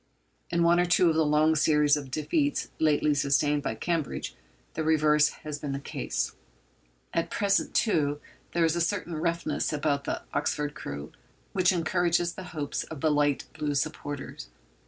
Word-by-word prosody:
In 170 0 +1
one 170 +1 +5
or 175 - +2
two 175 0 +4
of - - -2
the 160 - +3
long 155 +1 +3
series 150 -1 +4
of 140 -3 -5
defeats 285 - 0
lately 150 -1 +3
sustained 145 +1 +2
by 110 - -3
Cambridge 165 +4 -2 0.4
the 160 - -2
reverse 150 -1 +4 0.2
has 150 -1 -4
been 145 -2 -4
the 140 - -3
case. 60 - -3 0.8
At 165 - 0
present, 200 -2 +1
too, 145 -9 +2 0.3
there 170 -1 +3
is 165 0 +1
a 170 - 0
certain 175 0 -1
roughness 170 +2 -1
about 145 -2 0
the - - -3
Oxford 150 0 -1
crew 70 - -7 0.4
which 185 -1 +3
encourages 175 0 +1
the 190 - -8
hopes 150 -5 -3
of 155 -4 -9
the 155 - +3
light 145 -1 +1
blue 145 -1 -2
supporters. 145 - -4
155 Hz, 165 wpm, -28 LUFS, 145-170 Hz, 0.8 s, one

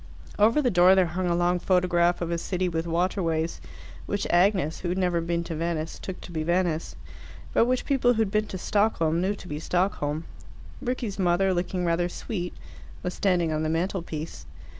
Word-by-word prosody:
Over 230 +8 +4
the 250 - +2
door 180 0 +6
there 190 -1 +4
hung 180 +2 -2
a 170 - +2
long 175 +1 +2
photograph 175 -1 +2
of 170 0 -2
a 170 - 0
city 185 +1 -1
with 165 -1 -2
waterways, 170 -1 0 0.5
which 205 0 -1
Agnes, 175 -3 +3
who 175 - -3
had 180 - -1
never 180 -2 +1
been 170 0 -1
to 165 -1 -5
Venice, 165 0 -3
took 190 -1 -6
to - - -10
be 160 -2 -2
Venice, 170 -1 0 0.6
but - - +4
which 250 +1 0
people 250 -3 +3
who 225 - +3
had 200 - -4
been 215 0 +1
to 190 - -5
Stockholm 175 -5 +1
knew 195 +3 0
to 190 - -12
be 150 -2 -4
Stockholm. 165 -3 -1 0.6
Rickie's 240 -5 -3
mother, 185 +1 +3
looking 180 0 -1
rather 170 +1 +1
sweet, 180 -1 -5 0.5
was 180 - -2
standing 175 -5 +1
on 155 - -1
the 155 - 0
mantelpiece. 165 -2 -3
175 Hz, 190 wpm, -26 LUFS, 170-190 Hz, 0.6 s, door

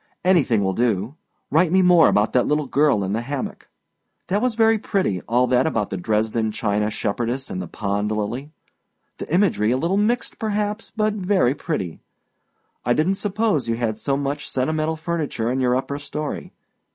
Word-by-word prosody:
Anything 140 - +3
will 95 0 0
do. 115 +1 0 0.4
Write 165 +3 +3
me 190 +1 +4
more 175 -2 +6
about 105 +1 +2
that 125 - +3
little 150 0 +1
girl 140 -6 +2
in 95 +1 -2
the 115 - 0
hammock. 135 +2 -5 0.6
That 200 +3 +1
was 250 -2 0
very 225 -1 +4
pretty, 190 - -1
all 120 +2 +3
that 125 +3 +2
about 110 -9 -1
the 95 - -2
Dresden 110 +3 0
china 105 -1 0
shepherdess 120 - -2
and 185 -2 -3
the - - -6
pond 105 0 -2
lily; 115 +7 -3 0.7
the - - -7
imagery 175 - +2
a 125 - +2
little 170 +7 0
mixed, 230 +4 0
perhaps, 210 0 -2
but 215 -1 +1
very 185 -10 +2
pretty. 95 - -4 0.8
I 120 - +2
didnât 180 +6 +1
suppose 205 - 0
you 115 - +1
had 115 -2 -1
so 135 +5 -1
much 145 +1 -3
sentimental 155 +4 0
furniture 155 -8 -2
in 130 - -1
your 125 -1 +2
upper 140 +2 -2
story. 150 +1 -5
140 Hz, 175 wpm, -22 LUFS, 110-180 Hz, 0.8 s, more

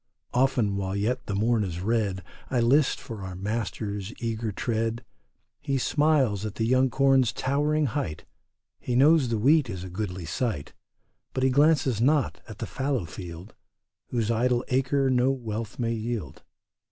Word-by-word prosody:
Often 125 -6 +2
while 95 0 -2
yet 120 +5 -1
the 100 - -2
morn 110 +2 +2
is 85 -3 -4
red 100 -2 0 0.3
I 125 - +1
list 130 +5 +3
for 110 -4 -8
our 95 -1 -6
master's 105 0 -3
eager 115 -1 -2
tread. 115 +2 -2 0.5
He 140 -2 -1
smiles 135 -7 +2
at 105 -1 -4
the 110 - 0
young 130 +2 +3
corn's 135 -2 +3
towering 150 +3 +1
height, 110 - -3 0.5
He 125 - -2
knows 140 0 +5
the 115 - 0
wheat 140 +4 +4
is 95 -4 -5
a 95 - -7
goodly 90 -2 -4
sight, 80 - -3 0.6
But 130 - 0
he 130 - +4
glances 140 -5 +3
not 145 +3 +2
at 110 -3 -9
the - - -4
fallow 135 -7 -2
field 85 +4 -9 0.5
Whose 115 -2 -1
idle 120 +2 +1
acres 135 +1 +2
no 125 +1 +3
wealth 115 -4 -4
may 115 -2 0
yield. 110 - -4
115 Hz, 160 wpm, -26 LUFS, 105-130 Hz, 0.6 s, knows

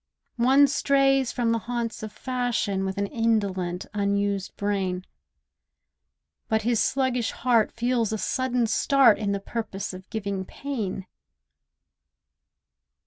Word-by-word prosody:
One 270 +4 +6
strays 275 -2 +2
from 235 -2 0
the 230 - +1
haunts 235 0 -4
of 215 -1 -6
fashion 235 -5 -1
With 190 +1 -3
an 200 - 0
indolent, 200 -5 -1
unused 200 -1 -1
brain; 195 -3 -1 1.4
But 220 -1 +1
his 235 -1 +2
sluggish 260 -3 +1
heart 235 -3 +2
feels 235 -2 0
a 220 - -1
sudden 250 +1 0
start 255 0 +4
In 205 -2 -1
the 200 - -1
purpose 200 -2 -5
of 185 0 -11
giving 200 -3 -3
pain. 210 -5 -5
220 Hz, 120 wpm, -25 LUFS, 200-245 Hz, 1.4 s, One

